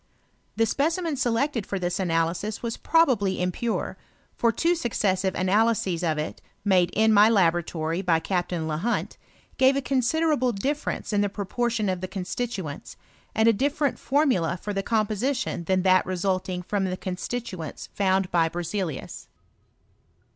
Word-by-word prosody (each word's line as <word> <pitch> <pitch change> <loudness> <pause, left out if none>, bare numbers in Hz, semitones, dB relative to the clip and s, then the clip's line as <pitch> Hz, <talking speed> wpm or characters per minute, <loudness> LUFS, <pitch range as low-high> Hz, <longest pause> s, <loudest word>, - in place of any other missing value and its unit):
The 225 - +3
specimen 320 +6 0
selected 245 -2 0
for 200 - -2
this 180 +1 -2
analysis 170 +4 -1
was 230 -1 -2
probably 245 - +2
impure; 180 +6 -2 0.4
for 235 - +2
two 330 +10 +1
snccessive 200 - 0
analyses 195 -2 +1
of 160 -3 +1
it, 150 +1 -4 0.2
made 185 -3 +4
in 220 +1 +4
ray 210 +2 +7
laboratory 170 -4 +1
by 170 -4 +2
Captain 175 -2 -2
Lehunt, 160 +10 -2 0.4
gave 265 +1 +5
a 275 - 0
considerable 265 0 +1
difference 275 +3 -2
in 205 - +3
the 205 - +1
proportion 215 +2 -1
of 185 -1 -1
the 185 - -3
constituents, 190 -4 -5 0.4
and 220 +1 +3
a 230 - +6
different 280 +4 0
formula 260 - +1
for 205 - -4
the 195 - -1
composition 220 -1 -1
than 185 +1 +1
that 185 -1 +5
resulting 185 0 -1
from 195 +1 -1
the 185 0 -2
constituents 185 -2 -5
found 190 -1 +1
by 165 -2 +3
Berzelius. 175 -2 -4
200 Hz, 140 wpm, -25 LUFS, 180-240 Hz, 0.4 s, ray